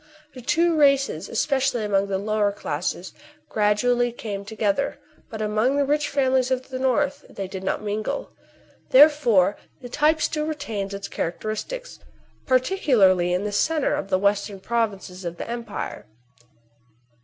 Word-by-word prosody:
The 255 - -10
two 335 +7 +2
races, 275 - +2
especially 265 -1 0
among 200 -1 +1
the 195 -1 -1
lower 210 0 0
classes, 175 0 -4 0.4
gradually 240 +3 +2
came 205 -4 -6
together; 215 +5 -1 0.3
but 220 -1 -4
among 215 +5 +1
the 285 0 +2
rich 295 +1 0
families 260 -2 +2
of 260 0 -2
the 260 -1 -4
north 280 +2 0
they 195 -1 -6
did 190 0 -7
not 190 - -2
mingle. 215 - -3 0.6
Therefore 255 - +5 0.2
the 245 - -9
type 300 +4 +2
still 305 0 -1
retains 215 -10 -4
its 200 0 -6
characteristics, 215 - -4 0.5
particularly 250 - +3
in 180 +2 0
the 210 - -2
centre 305 +8 +1
of - - -2
the 185 - +3
western 200 0 0
provinces 195 -4 -2
of 170 -1 -5
the - - -6
empire. 235 -2 -5
225 Hz, 145 wpm, -24 LUFS, 200-275 Hz, 0.6 s, Therefore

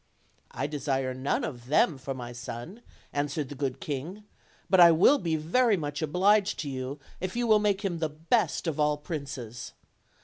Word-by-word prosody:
"I - - -3
desire 135 -3 -1
none 130 +2 -1
of 120 -4 -6
them 145 0 +3
for 135 0 -5
my 120 -2 -7
son," 120 - -8 0.3
answered 145 0 -2
the - - -6
good 135 -2 -3
king; 155 +9 -5 0.4
"but 190 - +4
I 170 -1 +10
will 185 - +5
be 165 -4 -1
very 200 +8 +2
much 145 -2 -4
obliged 195 +6 +3
to 145 - -4
you 130 +1 -4 0.2
if 185 +2 -4
you 240 0 0
will 215 -2 +5
make 205 -1 0
him 175 -4 -2
the 160 -1 0
best 165 +11 0
of 160 -3 -2
all 150 0 +2
princes. 135 -7 -6
150 Hz, 180 wpm, -28 LUFS, 135-185 Hz, 0.4 s, I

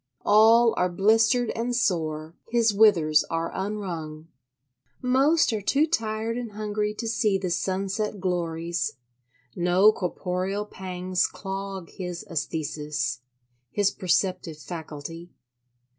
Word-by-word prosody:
All 225 +2 +6
are 180 - +2
blistered 225 +6 +3
and 240 +2 -2
sore: 160 -9 -1 0.2
his 230 -2 +3
withers 170 -8 +5
are 165 0 -2
unwrung. 170 -6 -5 0.7
Most 270 +3 +3
are 215 - -1
too 285 +9 +3
tired 225 -5 -1
and 235 -4 -6
hungry 210 0 -2
to 230 - -4
see 215 -3 +1
the 185 -2 -3
sunset 195 +4 -2
glories; 170 -2 -2 0.6
no 180 +4 +5
corporeal 185 +1 -3
pangs 185 -2 -2
clog 195 -2 -6
his 180 -3 -6
æsthesis—his 130 - -3
perceptive 180 -2 0
faculty. 160 +1 -8
190 Hz, 105 wpm, -26 LUFS, 165-215 Hz, 0.7 s, All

